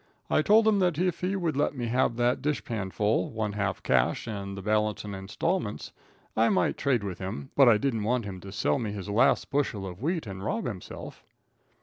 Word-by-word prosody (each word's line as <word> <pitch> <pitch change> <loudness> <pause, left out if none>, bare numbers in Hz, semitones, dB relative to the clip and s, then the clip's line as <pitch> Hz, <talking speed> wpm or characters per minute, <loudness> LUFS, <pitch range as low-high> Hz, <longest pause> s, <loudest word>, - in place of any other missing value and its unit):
I - - +4
told 215 +7 +5
him 210 -2 +4
that 180 -5 +2
if 180 0 0
he 185 +2 -1
would 170 -6 -1
let 145 +1 +1
me 120 - -2
have 120 0 +1
that 120 +1 +1
dishpan 120 -9 -2
full, 105 +2 +1
one 110 -2 -3
half 100 -2 -2
cash 60 -2 +2
and 100 -3 -5
the - - -5
balance 105 0 0
in 105 - -5
installments, 105 - -2 0.4
I 115 +1 +4
might 190 - +2
trade 130 -7 +1
with 95 -3 -5
him, 80 -7 -5
but 135 -3 +7
I 110 - +6
didn't 115 -1 -1
want 115 +2 0
him 95 -2 -6
to 95 +2 -10
sell 110 +6 +1
me 110 -4 -3
his 100 -1 -6
last 105 +7 +3
bushel 130 -8 0
of 90 +1 -8
wheat 165 +2 -1
and 95 -2 -7
rob 115 +2 -2
himself. 105 -7 -7
110 Hz, 215 wpm, -28 LUFS, 100-140 Hz, 0.4 s, but